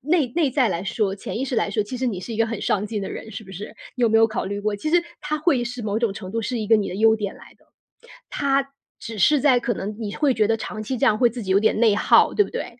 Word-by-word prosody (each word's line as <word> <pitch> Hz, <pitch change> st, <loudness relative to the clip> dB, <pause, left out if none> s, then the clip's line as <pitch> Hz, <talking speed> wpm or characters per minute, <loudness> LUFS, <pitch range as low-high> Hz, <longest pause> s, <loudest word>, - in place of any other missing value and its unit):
内 305 Hz, 0 st, +2 dB
内 320 Hz, -5 st, +2 dB
在 255 Hz, -3 st, +2 dB
来 175 Hz, -1 st, -2 dB
说， 195 Hz, 0 st, -1 dB
潜 200 Hz, -, -6 dB
意 265 Hz, -, -1 dB
识 260 Hz, -, -3 dB
来 215 Hz, -, 0 dB
说， 210 Hz, +1 st, 0 dB
其 230 Hz, +5 st, -6 dB
实 260 Hz, -, -1 dB
你 200 Hz, -7 st, -2 dB
是 230 Hz, +5 st, -7 dB
一 220 Hz, -, -5 dB
个 225 Hz, -, +3 dB
很 225 Hz, -2 st, -4 dB
上 210 Hz, +1 st, 0 dB
进 210 Hz, -2 st, -4 dB
的 -, -, -5 dB
人， 220 Hz, -, -7 dB
是 210 Hz, +1 st, -8 dB
不 190 Hz, -, -12 dB
是？ 205 Hz, +4 st, -6 dB, 0.3 s
你 250 Hz, -, -3 dB
有 230 Hz, -, +5 dB
没 225 Hz, -, +3 dB
有 225 Hz, 0 st, +6 dB
考 220 Hz, -3 st, -3 dB
虑 200 Hz, +1 st, -3 dB
过 210 Hz, 0 st, -1 dB
其 310 Hz, +10 st, -3 dB
实 350 Hz, 0 st, +4 dB, 0.2 s
它 300 Hz, +1 st, -2 dB
会 295 Hz, -5 st, +1 dB
是 240 Hz, 0 st, -6 dB
某 210 Hz, +1 st, -1 dB
种 230 Hz, -4 st, 0 dB
程 185 Hz, -3 st, -8 dB
度 230 Hz, -, -1 dB
是 240 Hz, +2 st, -3 dB
一 215 Hz, -, -3 dB
个 225 Hz, 0 st, +5 dB
你 205 Hz, -, -1 dB
的 -, -, -5 dB
优 220 Hz, +2 st, +4 dB
点 205 Hz, -3 st, -4 dB
来 -, -, -16 dB
的。 -, -, -29 dB, 0.6 s
它 275 Hz, -1 st, 0 dB, 0.3 s
只 220 Hz, -2 st, -7 dB
是 295 Hz, +6 st, +4 dB
在 260 Hz, -4 st, +4 dB
可 240 Hz, 0 st, -1 dB
能 205 Hz, +2 st, -5 dB
你 205 Hz, -3 st, -4 dB
会 285 Hz, -4 st, +2 dB
觉 215 Hz, -2 st, +2 dB
得 225 Hz, 0 st, +1 dB
长 215 Hz, -1 st, -6 dB
期 250 Hz, +4 st, -3 dB
这 -, -, +1 dB
样 210 Hz, -, +4 dB
会 240 Hz, 0 st, +4 dB
自 235 Hz, -1 st, -7 dB
己 190 Hz, -, -2 dB
有 195 Hz, -, +5 dB
点 220 Hz, 0 st, +1 dB
内 220 Hz, -3 st, +4 dB
耗， -, -, +4 dB
对 415 Hz, -, +4 dB
不 -, -, -9 dB
对？ 250 Hz, -, -6 dB
225 Hz, 340 characters per minute, -23 LUFS, 205-255 Hz, 0.6 s, 有